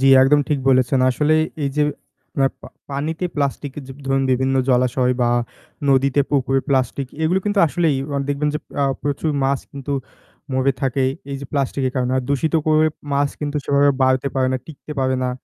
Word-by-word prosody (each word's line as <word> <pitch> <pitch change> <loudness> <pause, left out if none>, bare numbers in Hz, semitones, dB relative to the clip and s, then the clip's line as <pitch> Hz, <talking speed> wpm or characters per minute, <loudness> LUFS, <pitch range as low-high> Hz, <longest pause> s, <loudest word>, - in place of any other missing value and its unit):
জ্বী 135 - +4
একদম 145 +2 +5
ঠিক 150 - +1
বলেছেন। 130 0 +3
আসলেই 155 +4 +2 0.2
এই 140 - 0
যে 150 - +3 0.6
আপ - - -2
পা - - -9 0.2
পানিতে 155 +5 -3
প্লাস্টিক 140 -1 -2
য - - -4 0.3
ধরুন 135 0 +2
বিভিন্ন 130 +1 +1
জলাশয় 125 0 +2
বা 120 - +2 0.6
নদীতে, 135 +1 +3
পুকুরে, 135 -1 +2
প্লাস্টিক 135 0 0 0.2
এগুলো 175 +4 +2
কিন্তু 205 0 0
আসলেই 155 0 +1 0.2
অ - - 0
দেখবেন 145 +1 0
যে - - 0 0.2
আ - - +3 0.2
প্রচুর 145 +2 -1
মাছ 135 0 +1
কিন্তু 140 0 -5 0.6
মরে 130 +1 +2
থাকে 135 -1 +1 0.3
এই 140 - -3
যে 140 - -7
প্লাস্টিকের 135 -2 -1
কারণে। 125 0 0
আর 130 - 0
দূষিত 140 +4 0
করে 155 0 +4 0.3
মাছ 140 0 +2
কিন্তু 150 0 -2
সেভাবে 140 0 +4
বাড়তে 130 +1 +2
পারে 130 -1 +2
না, - - +1
টিকতে 155 -1 -9
পাবে 130 0 +1
না। 125 - 0
140 Hz, 185 wpm, -20 LUFS, 130-145 Hz, 0.6 s, একদম